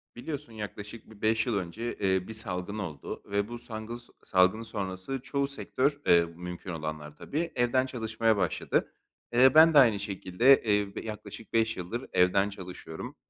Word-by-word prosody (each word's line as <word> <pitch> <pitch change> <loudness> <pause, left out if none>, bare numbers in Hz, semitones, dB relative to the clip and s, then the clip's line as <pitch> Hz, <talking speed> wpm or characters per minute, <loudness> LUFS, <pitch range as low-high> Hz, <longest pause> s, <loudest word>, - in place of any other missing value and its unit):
Biliyorsun 135 -2 -6
yaklaşık 105 +1 -8
bir 105 -1 -16
5 110 +1 +2
yıl 120 -4 0
önce, 105 +6 -4
eee, 95 -2 +1
bir 110 - -6
salgın 100 -2 -2
oldu 80 -9 -6
ve 100 0 -1
bu 120 +1 -7
sangıls 115 +1 -7 0.2
salgın 95 +4 +3
sonrası 100 +3 -4
çoğu 140 0 -1
sektör, 140 +1 -1
eee, 85 -1 +6
mümkün 90 +2 -7
olanlar, 75 -2 -5
tabii, 165 +3 -3
evden 125 +1 +2
çalışmaya 115 -3 0
başladı. 95 -4 0 0.4
Eee, 130 +2 +6
ben 160 +1 +8
de 145 - +8
aynı 115 -6 +5
şekilde, 100 +6 +3
eee, 105 -2 +1
b - - -4
yaklaşık 105 0 -8
5 115 0 +2
yıldır 95 +8 -4
evden 95 +2 +3
çalışıyorum, 90 -4 -8
105 Hz, 160 wpm, -29 LUFS, 95-120 Hz, 0.4 s, ben